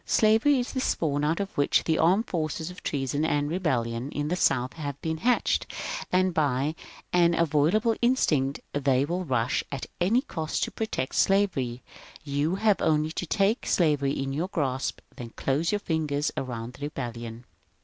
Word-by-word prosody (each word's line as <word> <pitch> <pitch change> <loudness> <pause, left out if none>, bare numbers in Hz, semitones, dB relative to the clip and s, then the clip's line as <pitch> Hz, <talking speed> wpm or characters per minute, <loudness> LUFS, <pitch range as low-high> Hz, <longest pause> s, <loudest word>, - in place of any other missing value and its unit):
Slavery 225 +6 +4
is 245 - -3
the 260 - -1
spawn 150 - 0
out 155 +3 +1
of 200 -1 -4
which 145 - +2
the 160 -1 +1
armed 185 +8 +4
forces 160 0 -3
of 180 - -12
treason 145 +1 -1
and 145 -2 +1
rebellion 125 -8 -1
in 145 0 -2
the 180 - +1
South 130 -7 +1
have 145 -3 -5
been 160 0 -2
hatched; 245 +8 +1 0.4
and 185 0 +2
by 145 -1 +1 0.4
an 170 -1 +4
inviolable 170 +9 +2
instinct 150 - +2
they 135 -1 +2
will 175 +4 -2
rush, 125 -6 0
at 140 -2 -4
any 220 +9 +3
cost, 160 - -3
to - - -2
protect 220 -11 -3
slavery. 155 -12 +1 0.4
You 145 +4 0
have 210 0 +2
only 155 0 +2
to 175 +1 -4
take 200 +6 +1
slavery 145 -5 +2
in 135 -1 -2
your 160 +6 -1
grasp, 135 -8 -2 0.2
then 120 -4 -8
close 145 +5 0
your 210 - +2
fingers 155 -6 -1
around 120 -2 -4
the 145 - -6
rebellion. 120 -4 -6
155 Hz, 170 wpm, -27 LUFS, 135-180 Hz, 0.4 s, Slavery